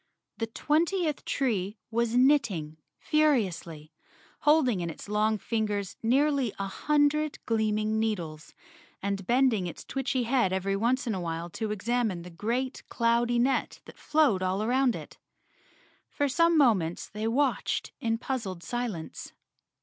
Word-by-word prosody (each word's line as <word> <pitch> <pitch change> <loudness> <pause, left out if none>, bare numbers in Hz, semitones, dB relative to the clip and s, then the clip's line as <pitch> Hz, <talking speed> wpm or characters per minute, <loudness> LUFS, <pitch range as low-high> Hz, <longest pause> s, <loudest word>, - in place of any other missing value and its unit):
The 225 - -1
twentieth 315 - 0
tree 215 -6 -1
was 235 +1 0
knitting 230 - +2 0.2
furiously, 185 - 0 0.5
holding 265 - +3
in 170 - -2
its 165 - -9
long 215 +1 +1
fingers 210 -3 -2
nearly 270 +1 +2
a 195 - -2
hundred 295 +8 +1
gleaming 215 -1 +1
needles, 170 -9 -3 0.5
and 195 -1 -2
bending 240 -7 +3
its 170 - -8
witchy 265 -1 0
head 240 -5 +2
every 190 +1 0
once 245 +5 +1
in 230 - -1
a 185 - -3
while 165 0 -4
to 220 +4 -3
exam¬ 225 +2 0
ine 170 -2 -6
the 180 - -10
great, 240 +9 -2
cloudy 235 0 +2
net 255 +3 +1
that - - -14
flowed 295 -12 +2
all 185 +2 0
around 250 +1 +2
it. - - -10 0.9
For 285 - 0
some 335 +4 +3
moments 195 - +2
they 215 +2 -4
watched 265 +4 0
in 225 -1 0
puzzled 215 -9 -4
silence. 235 -10 -5
225 Hz, 140 wpm, -28 LUFS, 195-260 Hz, 0.9 s, holding